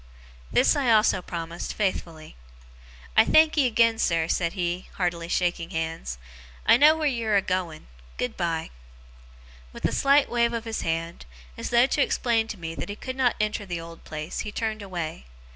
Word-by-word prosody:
This - - +4
I 265 -5 +2
also 215 -4 +4
promised, 170 -1 -5
faithfully. 170 -6 -3 0.8
'I - - +7
thankee 310 -3 +4
agen, 230 -1 +3
sir,' 165 -5 +2
he 160 - -5
said, 175 +1 -1
heartily 175 -2 -1
shaking 175 -1 -1
hands. 160 - -4 0.5
'I - - +7
know 300 +3 +7
wheer 315 - -2
you're 230 -6 +1
a 200 - +4
going. 180 -4 -3 0.3
Good 125 - -2
bye!' 165 -2 -2 1.0
With - - -6
a - - +2
slight 280 +1 +4
wave 235 0 +1
of 230 0 -3
his 225 -1 -3
hand, 165 - -3 0.3
as - - -5
though 240 +1 +5
to 285 - 0
explain 230 -4 +1
to 215 - -6
me 165 -2 -6
that 165 - -6
he 205 - -4
could 255 +4 -6
not 255 -3 +2
enter 215 0 -1
the 175 -4 -4
old 165 0 -11
place, 155 +1 -6
he 210 - -4
turned 220 0 -3
away. 170 - -5
190 Hz, 175 wpm, -25 LUFS, 165-230 Hz, 1.0 s, I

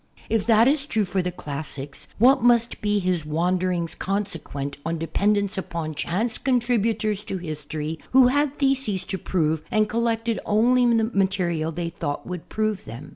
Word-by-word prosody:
H 225 -1 +1
that 225 +1 +6
is 285 +1 +1
true 220 -8 +1
for 185 +1 -1
the 180 0 -2
classics 145 -3 -6
what 260 +4 +5
must 235 -1 +3
be 210 0 +1
his 180 -4 0
wanderings 175 +2 0
consequent 165 -8 -3
on 165 0 -2
de 165 - -3
pendence 200 +2 +1
upon 165 -4 -4
chance 215 +10 -1
contributors 225 -5 0
to 190 - -3
history 155 -1 -5
who 260 0 +7
had 285 +2 +1
theses 265 -9 +1
to 190 0 -4
prove 160 -4 0
and 215 0 +2
collected 230 0 0
only 240 +3 +3
the 225 - +2
material 190 -7 0
they 170 +1 -3
thought 150 -3 -4
would 180 -2 -7
prove 215 -2 -1
them? 120 +7 -9
195 Hz, 165 wpm, -24 LUFS, 165-230 Hz, -, who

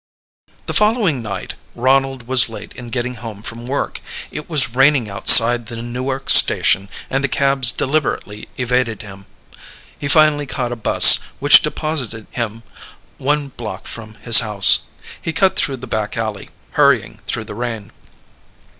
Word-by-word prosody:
The - - -4
following 210 - +1
night 100 -4 -7 0.2
Ronald 135 0 0
was 130 -2 +3
late 115 - -10
in 120 -1 -11
getting 125 +1 -4
home 110 -3 -9
from 120 +1 -9
work. 140 +2 -4 0.3
It 150 - -8
was 145 -8 +1
raining 135 -4 +2
outside 115 +4 +5
the 115 -1 -8
Newark 130 +3 -5
station 95 +1 +4 0.2
and 135 +1 -2
the - - +1
cabs 135 -1 +1
deliberately 135 -8 -3
evaded 125 -4 -2
him. 95 -1 -13 0.7
He 140 - -4
finally 150 -1 +2
caught 125 -2 -4
a - - -4
bus, 115 - +7 0.2
which 145 +1 +7
deposited 150 -8 -3
him 115 -1 -5 0.6
one 145 +1 -2
block 110 -7 -9
from 110 -2 -7
his 110 +2 +4
house. 105 -4 +4 0.4
He 160 - -4
cut 190 +2 +1
through 135 -2 -1
the 130 - -10
back 110 -3 -4
alley, 110 -3 -5 0.2
hurrying - - +1
through - - -4
the - - -9
rain. 115 -2 -6
125 Hz, 150 wpm, -17 LUFS, 110-140 Hz, 0.7 s, bus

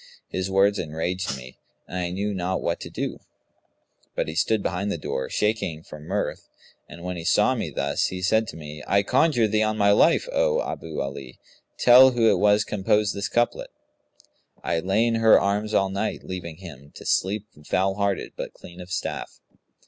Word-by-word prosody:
His 95 +1 -3
words 100 +1 +3
enraged 80 -1 -3
me 65 0 -12 0.3
and - - -8
I 90 -1 -2
knew 100 +3 -2
not 95 0 -1
what 85 - -1
to - - -7
do, - - -4 1.0
but - - -1
he 80 - -4
stood 105 +5 +1
behind 100 +3 -2
the 85 - -2
door, 65 - -4
shaking 105 -7 -1
for 75 - -11
mirth; 75 - -4 0.4
and, 85 - -11
when 90 0 -4
he 85 - -6
saw - - +3
me - - -3
thus, 70 +1 0
he 90 0 -5
said 110 +3 +2
to - - -8
me, 75 -1 -9
'I 100 0 +3
conjure 130 0 +3
thee 110 +1 +1
on 110 0 0
my 100 -1 +4
life, 165 - +4
O - - +2
Abu 80 - -5
Ali, 70 -1 -6 0.4
tell 125 +2 +8
who 115 -2 +4
it 95 - +1
was 105 +1 +4
composed 105 +1 +1
this 100 +1 -3
couplet?, 120 0 0 0.9
'I 85 - 0
lay 95 +6 +1
in 115 -1 +1
her 110 -1 +7
arms 105 +2 -1
all 95 -3 +2
night, 100 +3 -3
leaving 85 -4 -6
him 70 -7 -11
* - - -35
To - - -11
sleep 100 +2 0 0.2
foul 95 +5 +1
hearted 100 -1 -1
but - - -6
clean 90 +1 -12
of 90 +1 -11
staff.' 95 - -4
95 Hz, 195 wpm, -24 LUFS, 85-105 Hz, 1.0 s, tell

